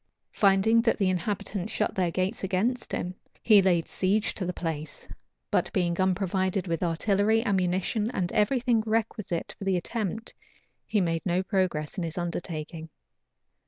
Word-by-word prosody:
Finding 200 +3 +4
that 230 0 +2
the 195 -3 +2
inhabitants 195 +2 -3
shut 210 - 0
their 180 -2 +1
gates 185 +6 -2
against 210 +6 -1
him, 180 - -2 0.3
he 210 -3 +7
laid 175 -3 +2
siege 200 +3 +1
to 185 - -4
the - - 0
place; 160 -4 -5 0.4
but - - +1
being 175 -2 +1
unprovided 190 0 0
with 165 -3 -2
artillery, 205 +6 +2
ammunition, 190 +2 0
and 180 -7 -2
every 215 +5 +2
thing 240 -2 +2
requisite 215 -5 -1
for - - -6
the 190 -1 +1
attempt, 220 +3 -4 0.5
he 215 - +1
made 165 -2 0
no 180 0 +1
progress 185 -5 -1
in - - -2
his 165 +2 -5
undertaking. 165 -2 -4
190 Hz, 155 wpm, -27 LUFS, 175-210 Hz, 0.5 s, he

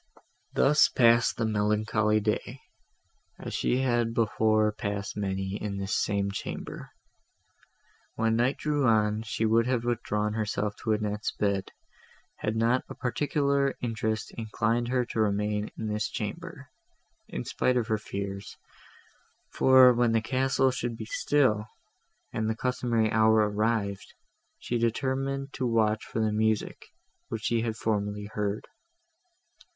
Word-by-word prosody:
Thus 150 +2 +4
passed 120 -1 +4
the 115 - 0
melancholy 105 0 +1
day, 110 +5 -2 0.8
as - - -7
she 125 - +1
had 120 -3 +1
before 110 -1 +2
passed 100 -1 -4
many 95 -1 -2
in 100 -2 -3
this 100 +1 -2
same 100 -1 0
chamber. 100 - -6 1.3
When 115 0 +1
night 120 +4 +1
drew 145 -3 0
on, 105 -1 +2
she 110 0 -2
would 115 +2 +3
have 125 -2 0
withdrawn 105 -3 -1
herself 105 -1 -2
to 110 - 0
Annette's 105 0 -2
bed, 100 -2 -1 0.7
had 110 +1 -2
not 115 +3 +2
a - - -7
particular 140 +1 0
interest 110 -2 -2
inclined 115 +1 -1
her 125 0 +1
to 115 - -4
remain 105 0 0
in 110 - -4
this 105 0 -1
chamber, - - -6 0.6
in 60 - -5
spite 125 0 +1
of 120 - +1
her 110 -2 0
fears; 100 -1 -6 1.0
for, 130 -1 +7
when 120 -1 +2
the 115 - +3
castle 130 +2 +2
should 120 -2 -3
be 110 - -6
still, 115 -3 +1 0.7
and 110 0 -1
the 110 - -1
customary 120 -3 0
hour 110 -1 +4
arrived, 105 -1 -1 0.4
she 120 - -2
determined 135 +4 -1
to 130 - -1
watch 110 -2 +1
for - - -5
the 110 -1 +1
music, 110 0 -1 0.4
which 110 -1 -5
she 115 -1 +1
had 115 -1 -2
formerly 105 -2 -2
heard. 105 0 -2
110 Hz, 135 wpm, -28 LUFS, 105-120 Hz, 1.3 s, for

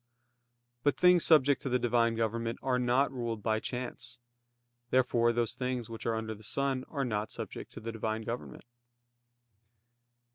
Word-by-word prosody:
But 145 +1 +2
things 180 -2 +6
subject 145 -3 +5
to 135 - -3
the 125 - +3
Divine 120 -1 +2
government 115 +1 -1
are 125 -1 +1
not 125 +3 +2
ruled 115 -4 -4
by 110 -1 +1
chance. 120 -1 -5 0.7
Therefore 120 -2 +3
those 120 -1 0
things 125 -3 -3
which 115 - -6
are 115 - +1
under 110 0 -3
the 105 - -13
sun 135 +3 -1
are 140 -3 -2
not 105 -2 -2
subject - - -7
to - - -7
the 115 +1 -5
Divine 110 0 -3
government. 120 +3 -6
120 Hz, 155 wpm, -31 LUFS, 115-130 Hz, 0.7 s, things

